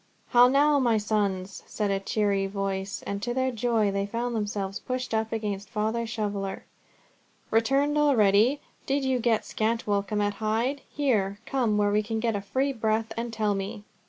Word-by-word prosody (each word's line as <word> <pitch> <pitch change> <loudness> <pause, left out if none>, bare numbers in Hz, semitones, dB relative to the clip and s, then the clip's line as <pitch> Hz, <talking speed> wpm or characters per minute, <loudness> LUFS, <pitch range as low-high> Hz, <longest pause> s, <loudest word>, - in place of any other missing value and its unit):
"How 245 0 +7
now, 285 +2 +4
my 235 -4 +3
sons?" 200 -3 -1
said 210 -2 -1
a 195 - +1
full 195 - -20
cheery 200 -2 +1
voice, 195 0 -3
and 200 0 -3
to 240 +2 -2
their 260 0 +1
joy, 225 -3 +1
they 200 0 -1
found 235 +3 -2
themselves 205 -1 -2
pushed 255 -1 -4
up 220 0 0
against 205 -3 -3
Father 220 +2 -1
Shoveller. 205 -3 -3 0.9
"Returned 275 +6 +2
already! 245 -1 +4 0.3
Did 275 0 +1
you 260 -1 +1
get 230 -2 +1
scant 225 +1 -1
welcome 205 0 0
at 205 0 +1
Hyde? 230 +6 0
Here, 215 -9 0
come 235 -6 +1
where 205 0 +2
we 210 +1 +3
can 220 +1 -3
get 225 -1 0
a 200 - -2
free 265 +7 -1
breath, 220 -1 -1
and 230 +1 -3
tell 215 -2 0
me." 200 +2 -4
220 Hz, 180 wpm, -27 LUFS, 205-240 Hz, 0.9 s, How